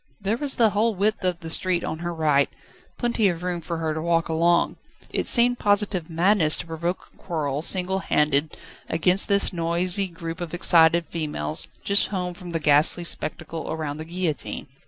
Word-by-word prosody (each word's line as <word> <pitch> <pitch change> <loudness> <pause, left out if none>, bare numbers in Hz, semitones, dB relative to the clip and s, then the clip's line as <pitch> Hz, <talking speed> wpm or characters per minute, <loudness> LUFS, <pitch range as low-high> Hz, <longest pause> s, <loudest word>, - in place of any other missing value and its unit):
There 205 +2 -1
was 285 +1 0
the 225 -3 +3
whole 220 +2 0
width 205 +2 0
of 180 -2 -1
the 165 - -7
street 180 0 +1
on 160 - -4
her 175 0 -4
right, 150 -4 +1 0.5
plenty 235 -3 +1
of 175 -2 -3
room 180 -1 -3
for 170 +1 -5
her 160 -1 -2
to 155 - -4
walk 165 0 0
along. 170 +2 +1 0.3
It - - -2
seemed 245 0 +4
positive 205 -4 0
madness 170 -1 +2
to - - -5
provoke 170 +2 -5
a - - -28
quarrel 150 -5 -3
singlehanded 160 -5 +2 0.3
against 180 +4 +2
this 200 -1 +2
noisy 175 +3 +1
group 165 0 -8
of 175 0 -5
excited 170 -1 +4
females, 155 0 -2 0.2
just 200 0 +2
home 180 -3 -4
from 175 0 -10
the 165 - -1
ghastly 150 +3 +3
spectacle 160 0 -3
around 155 -2 -4
the 155 - -7
guillotine. 170 -2 -4
170 Hz, 175 wpm, -23 LUFS, 160-190 Hz, 0.5 s, seemed